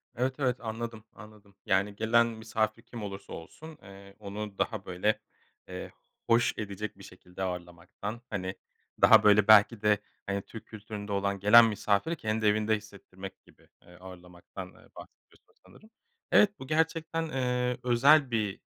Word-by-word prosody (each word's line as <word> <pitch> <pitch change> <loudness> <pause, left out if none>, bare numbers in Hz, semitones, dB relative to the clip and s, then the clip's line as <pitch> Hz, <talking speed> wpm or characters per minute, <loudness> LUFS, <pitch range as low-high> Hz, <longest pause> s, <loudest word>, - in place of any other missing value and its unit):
Evet, 130 +2 -1
evet. 125 -3 +1
Anladım, 115 -1 -6
anladım. 105 -1 -16
Yani, 100 +1 +1
gelen 115 +2 +3
misafir 110 0 -2
kim 115 -2 -9
olursa 100 -1 -8
olsun, 155 - -11
eee, 100 0 -14
onu 100 0 -7
daha, 110 -4 -2
böyle, 105 +4 0 0.5
eee, - - -7 0.4
hoş 120 +1 +3
edecek 105 -1 -5
bir 100 - -14
şekilde 90 0 -10
ağırlamaktan, 90 +5 -6
hani, 95 -2 -4 0.5
daha - - +8
böyle 105 -1 +5
belki 110 +1 +6
de 105 -1 +3 0.3
hani 100 0 -2
Türk 110 +3 -11
kültüründe 105 -1 -8
olan, 100 0 -1
gelen 110 +4 +8
misafiri 105 - 0
kendi 110 -5 -2
evinde 105 +1 +2
hissettirmek 100 -2 -12
gibi, - - -23
eee, 90 - -18
ağırlamaktan, 90 0 -11
eee, - - -20
bahsediyorsun - - -17
sanırım. 215 - -18 0.4
Evet, 205 -1 +4
bu 130 - -9
gerçekten, 165 +1 -1
eee, 125 -2 -1
özel 130 +3 +4
bir, 105 -4 -1
105 Hz, 145 wpm, -29 LUFS, 100-120 Hz, 0.5 s, daha